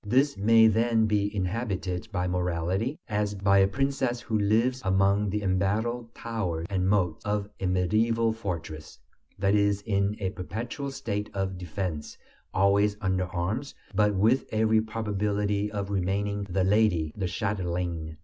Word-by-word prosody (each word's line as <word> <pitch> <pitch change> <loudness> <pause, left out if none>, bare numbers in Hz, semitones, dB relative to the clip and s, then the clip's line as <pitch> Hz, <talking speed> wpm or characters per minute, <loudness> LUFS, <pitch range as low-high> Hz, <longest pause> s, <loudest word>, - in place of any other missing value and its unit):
This 135 +7 +2
may 115 +3 +5
then 110 +1 +3
be 105 -1 +1
inhabited 95 -2 -2
by 90 -3 -1
morality, 90 - -1
as 105 -2 -1
by 100 0 +3
a 95 - +5
princess 130 +1 -1
who 110 -3 -1
lives 115 +5 +2
among 100 +1 +2
the 105 +2 -2
embattled 110 +5 -1
towers 95 -8 -3
and 95 -1 +1
moats 90 -6 +1
of 105 -1 -1
a 95 - -1
medieval 110 +5 +2
fortress 85 -7 -6 0.4
that 100 0 +2
is 100 -1 +2
in 100 -1 0
a 95 -2 -1
perpetual 115 - -5
state 105 -6 -3
of 95 -1 -1
defense, 90 -3 -4 0.3
always 100 +2 +3
under 95 -2 0
arms, 105 +10 -3 0.2
but 105 0 +2
with 110 +7 +3
every 110 0 +3
probability 105 -1 -1
of 100 -1 -3
remaining 100 +1 -1
the 95 +1 +1
"lady," 95 -6 +2
the 95 -3 -2
"châtelaine." 85 -4 -3
100 Hz, 145 wpm, -27 LUFS, 95-110 Hz, 0.4 s, may